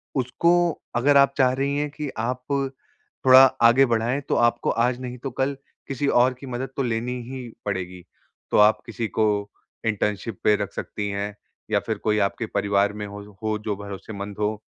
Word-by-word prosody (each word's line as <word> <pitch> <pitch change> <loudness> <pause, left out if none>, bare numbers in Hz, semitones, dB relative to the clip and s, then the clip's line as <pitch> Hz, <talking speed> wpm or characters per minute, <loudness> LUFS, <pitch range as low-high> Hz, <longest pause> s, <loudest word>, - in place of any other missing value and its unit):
उसको 130 +6 +2 0.4
अगर 140 +4 +4
आप 140 0 +5
चाह 130 -2 +4
रही 140 +2 -1
हैं 150 0 -1
कि 150 -1 -5
आप 125 +3 -2 0.8
थोड़ा 130 0 +9 0.2
आगे 120 +4 +7
बढ़ाएँ 120 +4 0
तो - - +2
आपको 120 0 +2 0.2
आज 125 0 -1
नहीं 125 0 -6
तो 135 0 -5
कल 135 +1 0 0.3
किसी 140 +1 -1 0.2
और 130 0 +2
की 130 +2 -12
मदद 125 +1 -4
तो 135 - +1
लेनी 120 +1 -2
ही 130 -2 -6 0.2
पड़ेगी। 90 -3 -4 0.5
तो - - +3
आप 105 +1 +6
किसी 115 -1 -4
को 110 - +5 0.6
इंटर्नशिप 105 -1 -1
पे 105 - +5
रख 100 - -4
सकती 105 -1 -4
हैं, 100 +1 -3 0.4
या 105 - +3
फिर 110 -2 -1
कोई 105 0 0
आपके 115 +3 -5
परिवार 100 0 +1
में 105 0 -5
हो 100 0 -8 0.2
हो 110 -1 0
जो 105 -1 -3
भरोसेमंद 100 0 -7
हो। 105 0 -1
115 Hz, 185 wpm, -24 LUFS, 105-130 Hz, 0.8 s, थोड़ा